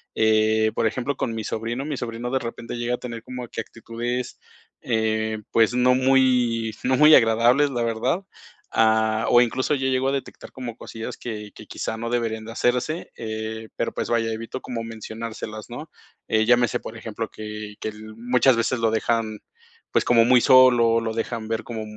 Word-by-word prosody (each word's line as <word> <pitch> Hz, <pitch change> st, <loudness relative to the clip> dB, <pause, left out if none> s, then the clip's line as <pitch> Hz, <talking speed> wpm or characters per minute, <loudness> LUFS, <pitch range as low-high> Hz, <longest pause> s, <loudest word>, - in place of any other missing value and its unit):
Eh, 110 Hz, 0 st, +3 dB
por 115 Hz, -, +1 dB
ejemplo, 130 Hz, +5 st, -2 dB
con 115 Hz, -, -2 dB
mi 110 Hz, -, -4 dB
sobrino, 115 Hz, +5 st, -3 dB
mi 150 Hz, -2 st, -3 dB
sobrino 120 Hz, 0 st, -4 dB
de 130 Hz, -, +1 dB
repente 115 Hz, 0 st, -6 dB
llega 120 Hz, +1 st, -1 dB
a -, -, -10 dB
tener 115 Hz, -2 st, -7 dB
como 125 Hz, -1 st, -6 dB
que -, -, -6 dB
actitudes, 120 Hz, +2 st, -5 dB, 0.4 s
eh, 110 Hz, -1 st, 0 dB
pues 115 Hz, +1 st, +3 dB
no 125 Hz, +1 st, +4 dB
muy 125 Hz, -3 st, +3 dB
no 130 Hz, +1 st, +2 dB
muy 150 Hz, +3 st, +7 dB
agradables, 120 Hz, +6 st, +4 dB
la 120 Hz, -2 st, -1 dB
verdad. 115 Hz, -, -1 dB, 0.5 s
Ah, 110 Hz, 0 st, +3 dB
o 120 Hz, -, +6 dB
incluso 130 Hz, +4 st, +1 dB
yo 135 Hz, -1 st, -1 dB
llego 130 Hz, 0 st, +1 dB
a -, -, 0 dB
detectar 140 Hz, -, -6 dB
como 120 Hz, -3 st, -7 dB
cosillas 115 Hz, -2 st, -7 dB
que 105 Hz, -3 st, -6 dB
que -, -, -11 dB
quizá 110 Hz, -, -4 dB
no 115 Hz, +1 st, -4 dB
deberían 115 Hz, -2 st, -2 dB
de 115 Hz, -, -8 dB
hacerse, 125 Hz, +8 st, -1 dB
eh, 110 Hz, 0 st, -5 dB
pero -, -, -2 dB
pues -, -, -3 dB
vaya, 115 Hz, -1 st, +1 dB
evito 115 Hz, +3 st, -6 dB
como 120 Hz, -2 st, -5 dB
mencionárselas, 110 Hz, -1 st, -7 dB
¿no? 150 Hz, +6 st, -8 dB, 0.4 s
Eh, 110 Hz, 0 st, +3 dB
llámese, 120 Hz, 0 st, +3 dB
por 110 Hz, -, -9 dB
ejemplo, 115 Hz, 0 st, -5 dB
que 105 Hz, -1 st, -7 dB
que -, -, -2 dB
l 110 Hz, 0 st, -11 dB
muchas 125 Hz, +2 st, +3 dB
veces 115 Hz, +2 st, 0 dB
lo 115 Hz, -1 st, +2 dB
dejan, 110 Hz, -1 st, -1 dB, 0.5 s
pues -, -, +2 dB
como 115 Hz, -1 st, +5 dB
muy 125 Hz, +1 st, +6 dB
solo, 120 Hz, -3 st, +6 dB
lo 110 Hz, -1 st, -3 dB
dejan 115 Hz, -1 st, -4 dB
ver 115 Hz, 0 st, -2 dB
como 115 Hz, -2 st, -5 dB
115 Hz, 185 wpm, -23 LUFS, 110-125 Hz, 0.5 s, muy